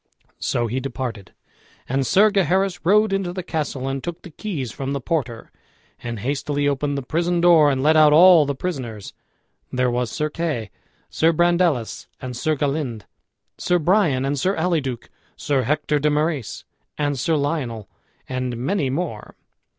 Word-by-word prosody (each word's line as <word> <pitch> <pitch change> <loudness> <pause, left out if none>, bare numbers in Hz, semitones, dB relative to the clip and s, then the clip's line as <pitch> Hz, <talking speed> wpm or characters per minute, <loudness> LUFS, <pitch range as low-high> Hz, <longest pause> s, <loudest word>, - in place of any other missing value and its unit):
So 120 - -1
he 120 +3 -2
departed, 125 -6 -5 0.6
and 135 0 0
Sir 210 - +5
Gaheris 190 -1 +1
rode 210 +4 +3
into 195 -2 -1
the 185 0 -5
castle, 150 -6 -3
and 135 0 -3
took 175 -1 -6
the 175 - -11
keys 150 - -5
from 135 +3 -4
the 140 - -2
porter, 125 -6 -3 0.5
and 120 -1 -5
hastily 145 +3 -1
opened 140 0 -1
the 140 - -3
prison 170 +5 0
door 170 -4 +6
and 135 -1 0
let 155 +2 +4
out 155 -1 +6
all 165 -1 +7
the 140 - -2
prisoners. 130 - -5 0.6
There 125 -1 +1
was 120 -1 -1
Sir 150 +6 -2
Kay, 150 -10 -3 0.4
Sir 165 +1 +3
Brandeles, 170 -7 +1
and 125 -1 -6
Sir 155 +6 0
Galynde, 140 -6 -2 0.6
Sir 180 - +2
Bryan, 165 -6 +2
and 140 0 -1
Sir 190 +7 +1
Alyduke, 160 -8 -2 0.3
Sir 140 -2 0
Hector 150 +3 0
de 150 +1 +2
Marys, 150 -4 -2 0.3
and 145 -2 -1
Sir 160 +6 +1
Lionel, 140 - -2 0.4
and 125 -2 -3
many 140 +3 -1
more. 135 -7 -4
145 Hz, 160 wpm, -22 LUFS, 130-170 Hz, 0.6 s, all